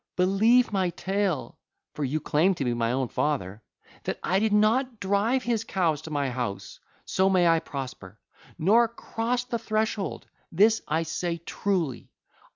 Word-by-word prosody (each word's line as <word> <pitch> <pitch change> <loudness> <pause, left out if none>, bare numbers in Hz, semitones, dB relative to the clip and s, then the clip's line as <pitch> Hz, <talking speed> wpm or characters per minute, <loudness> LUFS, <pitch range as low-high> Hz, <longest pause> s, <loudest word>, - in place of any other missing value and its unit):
Believe 215 +6 +3
my 190 -2 +1
tale 190 -3 -2 0.3
(for 150 - -4
you 145 +3 -1
claim 170 +6 +2
to 140 - -3
be 120 - +1
my 115 0 0
own 130 0 0
father), 115 -8 -2 0.4
that - - -3
I 190 +2 +2
did 220 +1 +1
not 225 +3 +2
drive 205 +7 +1
his 230 -2 0
cows 165 -8 0
to 160 - -9
my 140 -3 -1
house—so 125 - -3
may 180 -2 +4
I 165 -1 +4
prosper—nor 140 - -2
crossed 235 +2 -3
the 235 - 0
threshold: 215 -2 -2 0.3
this 215 +6 +4
I 160 +2 0
say 170 +1 -3
truly. 170 -4 -2
185 Hz, 150 wpm, -26 LUFS, 150-215 Hz, 0.4 s, may